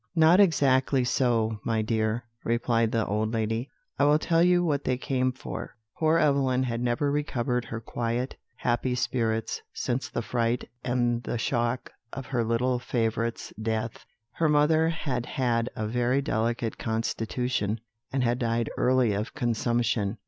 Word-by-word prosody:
"Not 165 +3 +6
exactly 135 -7 +4
so, 115 -3 +1
my 110 -2 0
dear," 110 +1 0 0.2
replied 115 -1 +1
the 115 -2 +1
old 110 +2 -1
lady; 115 +2 -1 0.3
"I 140 - +5
will 145 +1 +5
tell 165 +1 +2
you 175 0 +4
what 145 -3 0
they 130 - 0
came 130 0 0
for. 125 - -7 0.2
Poor 160 0 +4
Evelyn 140 -4 +2
had 120 -2 -2
never 125 +4 +1
recovered 125 -4 -1
her 115 - -5
quiet, 120 +2 -3 0.2
happy 125 +1 0
spirits 115 -3 -1
since 125 +2 -2
the 120 - -3
fright 120 +1 -1 0.2
and 120 -1 +1
the 120 - -3
shock 120 +1 -1 0.2
of 135 - -5
her 125 -3 0
little 120 +2 +1
favourite's 115 -1 -2
death. 110 0 -2 0.3
Her 160 -2 +1
mother 155 +2 +4
had 135 -7 -2
had 120 -2 0
a 110 - -2
very 125 +4 +1
delicate 115 -2 -1
constitution, 115 0 -1 0.3
and 130 -1 0
had 120 +1 +1
died 115 -1 0
early 125 -4 +3
of 105 +6 -3
consumption. 120 -4 0
120 Hz, 150 wpm, -27 LUFS, 115-130 Hz, 0.3 s, Not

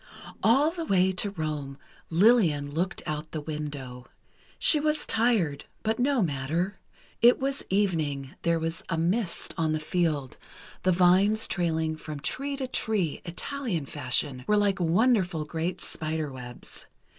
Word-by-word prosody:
All 275 +8 +4
the 335 -1 -4
way 190 - +3
to 190 +2 -1
Rome, 155 -6 -4 0.3
Lillian 165 -7 +4
looked 175 +5 -2
out 155 +1 -4
the 155 - -2
window. 145 -5 -6 0.5
She 305 - +4
was 305 0 0
tired, 220 -11 +1 0.2
but 220 +2 0
no 260 -2 +2
matter. 165 +6 -2 0.4
It 240 +1 +7
was 275 +1 -2
evening, 155 -9 0
there 170 -1 +2
was 165 0 -3
a 165 - 0
mist 175 +3 -1
on 160 -1 +1
the 155 - 0
field—the 155 +2 -2
vines 185 +5 +4
trailing 160 -3 0
from 155 -1 -7
tree 275 - -2
to 270 - -2
tree, 215 - -1
Italian 190 - -3
fashion, 130 -1 0
were 210 - +4
like 200 -2 +2
wonderful 180 -2 +2
great 170 +3 -3
spiderwebs. 145 -6 -5
170 Hz, 135 wpm, -27 LUFS, 150-210 Hz, 0.5 s, It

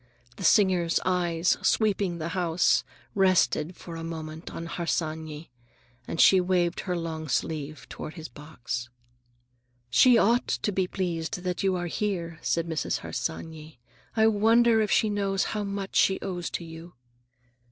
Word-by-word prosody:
The - - -7
singer's 180 -3 +4
eyes, 175 -2 +1
sweeping 200 -5 +1
the 165 0 -4
house, 175 -1 +2 0.3
rested 185 -3 +2
for 170 -2 -9
a 165 - -6
moment 160 -1 -7
on 165 - -6
Harsanyi, 160 -3 -3 0.6
and 165 - -5
she 190 -1 +7
waved 180 -1 +1
her 180 -2 -2
long 160 -2 -4
sleeve 150 -2 -3
toward 155 - -8
his 160 -2 -7
box. 125 -5 -6 1.0
"She 240 - +6
ought 235 +3 +3
to 210 - -1
be 190 -1 0
pleased 175 -2 -3
that 180 -1 -2
you 190 -1 +1
are 175 -1 -2
here," 170 -3 -3
said 165 -1 0
Mrs. 160 -2 -2
Harsanyi. 160 -2 -5 0.4
"I 220 - +5
wonder 225 +1 +4
if 210 - 0
she 220 - +3
knows 200 -2 0
how 210 -1 -2
much 200 -1 -3
she 190 - +4
owes 175 -3 -4
to - - -4
you." 165 +1 -11
175 Hz, 150 wpm, -27 LUFS, 160-195 Hz, 1.0 s, she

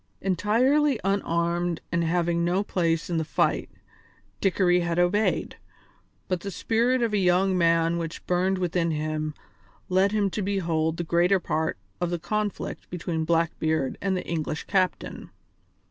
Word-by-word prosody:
Entirely 240 - +2
unarmed 175 -3 0
and 170 0 +1
having 170 0 +1
no 180 +4 +1
place 165 -5 0
in 170 - -1
the 160 - +1
fight, 155 - 0 0.7
Dickory 180 -2 +3
had 170 -1 -1
obeyed, 185 +5 +1 0.7
but 185 -2 -1
the 200 - -5
spirit 235 +6 +1
of 225 -2 0
a 205 - +2
young 185 +1 +3
man 165 -1 +2
which 165 -1 -6
burned 185 +2 +1
within 175 -2 0
him 155 -1 -2 0.5
led 190 +2 +3
him 205 -2 +1
to 210 - -2
behold 165 -5 0
the 170 - -2
greater 175 +4 +3
part 160 -2 -1 0.2
of 175 - 0
the 175 - -1
conflict 210 +3 -3
between 165 -2 -3
Blackbeard 160 -3 0
and 190 -2 0
the - - -5
English 155 -1 -3
captain. 185 -2 -1
175 Hz, 145 wpm, -26 LUFS, 165-195 Hz, 0.7 s, Dickory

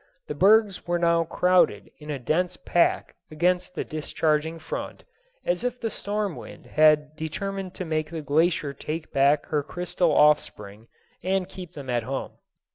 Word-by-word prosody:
The - - -4
bergs 200 +4 +3
were 175 0 +1
now 170 -1 +2
crowded 180 +2 +2
in 150 0 -11
a 145 - -2
dense 175 +8 -1
pack 175 - +1 0.2
against 180 +3 0
the - - -2
discharging 155 0 -1
front, 160 - -6 0.4
as 175 +5 0
if 250 0 -2
the 225 -2 -2
storm 205 -3 -2
wind - - -11
had 155 -1 +3
determined 190 +4 -5
to 185 - -5
make 155 -1 -2
the 160 -2 -6
glacier 150 -1 +1
take 155 +3 -6
back 140 +2 +3
her 150 -2 +1
crystal 175 +2 -1
offspring 115 -8 +2 0.3
and 190 0 0
keep 185 -3 -10
them 140 -3 -8
at 120 -1 +1
home. 130 +4 -4
165 Hz, 160 wpm, -25 LUFS, 150-180 Hz, 0.4 s, bergs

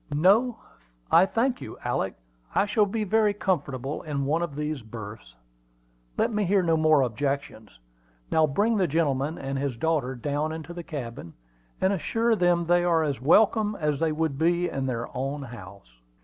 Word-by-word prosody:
"No, 215 - +4 0.5
I 190 - +6
thank 245 +4 0
you, - - -8
Alick. 110 -6 -1 0.4
I - - +4
shall 210 0 +2
be 215 +2 -2
very 210 0 +2
comfortable 140 -8 -2
in 145 -3 -3
one 155 +4 +1
of 170 -5 -3
these 150 -1 -3
berths. 110 - -10 0.8
Let - - +1
me 210 0 +1
hear 195 0 +2
no 165 -2 +2
more 155 -2 +4
objections. 130 - -3 0.5
Now 160 -1 +4
bring 210 +10 +1
the 185 -3 +2
gentleman 150 -1 0
and 135 0 -3
his 135 -4 -2
daughter 145 -3 0
down 145 +5 -2
into 160 +2 -7
the 175 - -6
cabin, 120 - -7 0.5
and 190 +1 +2
assure 225 +5 +1
them 175 -3 +2
they 175 +1 +3
are 170 -2 +3
as 140 -5 -2
welcome 210 - +4
as 150 -3 0
they 165 -1 +1
would 155 -3 -1
be 175 +2 +2
in 135 -1 -3
their 120 -2 -2
own 135 +3 -3
house." 100 - -12
155 Hz, 175 wpm, -26 LUFS, 135-180 Hz, 0.8 s, I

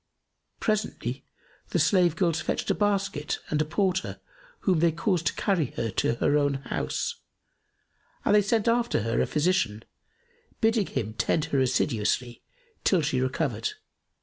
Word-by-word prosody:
Presently 140 - -2 0.5
the - - 0
slave 175 0 +3
girls 170 -4 +1
fetched - - -1
a - - +3
basket 200 -7 0
and 150 0 +2
a - - +1
porter 185 +3 -1 0.4
whom 185 -5 +2
they 170 +1 +4
caused 170 -1 0
carry 185 - +1
her 115 -2 -1
to 115 - +1
her 145 +5 +2
own 145 -1 +1
house; 135 -1 -3 1.1
and - - +3
they 210 - +6
sent 215 +2 +1
after 235 - +2
her 115 +1 +1
a - - +1
physician, 150 - +1 0.8
bidding 225 -3 +2
him 110 0 -3
tend 150 +7 0
her 140 - +4
assiduously 120 -1 0 0.4
till 180 -5 +3
she 135 -4 0
recovered. 130 -4 -1
160 Hz, 145 wpm, -27 LUFS, 130-195 Hz, 1.1 s, they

